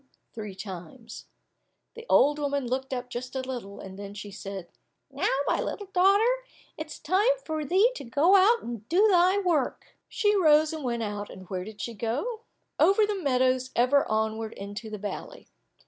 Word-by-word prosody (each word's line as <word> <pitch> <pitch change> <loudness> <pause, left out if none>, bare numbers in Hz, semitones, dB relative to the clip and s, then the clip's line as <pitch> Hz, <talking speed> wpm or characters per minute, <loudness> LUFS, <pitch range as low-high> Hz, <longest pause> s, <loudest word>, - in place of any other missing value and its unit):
three 210 -4 -7
times. 195 +4 -9 0.7
The 465 0 -11
old 295 +1 +5
woman 285 -2 -1
looked 260 +2 -3
up 250 -1 -3
just 250 +2 -6
a 265 - -1
little, 245 -6 -6
then 200 +1 -9
she 205 0 -8
said, 195 -3 -7 0.4
"Now, - - -1 0.2
my - - +1
little 410 -2 -5
daughter, 410 +7 +4 0.3
it - - -6
is - - -9
time 425 +7 +2
for 315 -1 -2
thee 385 - +3
to - - -7
go 290 +10 +3
out 420 +5 +5
and 230 -2 -7
do 385 +7 +5
thy 365 +1 +4
work." 345 -9 -1
She 415 -1 +2
rose 310 -4 +4
and 315 -2 -5
went 235 -2 -1
out, 205 -1 -4
and 185 -1 -11
where 185 -1 -2
did 215 +1 -9
she 235 - -4
go? 260 - -3 0.4
Over 405 +2 +5
the 415 - -1
meadows 255 -2 +1
ever 255 +4 +3
onward 220 0 -1
into 205 +3 -7
the 215 - -5
valley. 205 0 -7
255 Hz, 180 wpm, -27 LUFS, 215-360 Hz, 0.7 s, old